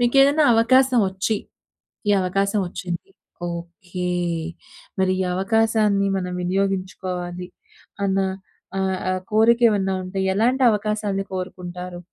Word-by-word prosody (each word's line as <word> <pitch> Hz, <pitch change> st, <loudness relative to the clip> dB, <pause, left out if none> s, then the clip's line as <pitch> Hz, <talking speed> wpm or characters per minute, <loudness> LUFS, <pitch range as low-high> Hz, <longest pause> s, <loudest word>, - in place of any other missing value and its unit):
మీకేదనా 275 Hz, +5 st, +5 dB
అవకాశం 255 Hz, +2 st, +4 dB
ఒచ్చి 190 Hz, +3 st, -1 dB, 0.7 s
ఈ -, -, +6 dB
అవకాశం 195 Hz, +3 st, 0 dB
ఒచ్చింది. 175 Hz, 0 st, -5 dB, 0.4 s
ఓకే! 175 Hz, +1 st, -6 dB, 0.9 s
మరి 190 Hz, 0 st, +3 dB
ఈ -, -, +1 dB
అవకాశాన్ని 210 Hz, 0 st, +2 dB
మనం 180 Hz, -1 st, -3 dB
వినియోగించుకోవాలి 185 Hz, -1 st, -2 dB, 0.6 s
అన్న 195 Hz, 0 st, +1 dB, 0.6 s
ఆహ్, 190 Hz, -1 st, 0 dB
ఆ -, -, +2 dB, 0.2 s
కోరిక 225 Hz, +2 st, +5 dB
ఏమన్నా 195 Hz, -2 st, 0 dB
ఉంటే 185 Hz, +1 st, -4 dB
ఎలాంటి 245 Hz, +6 st, +2 dB
అవకాశాన్ని 210 Hz, -2 st, -1 dB
కోరుకుంటారు? 180 Hz, -1 st, -6 dB
195 Hz, 105 wpm, -22 LUFS, 180-220 Hz, 0.9 s, ఈ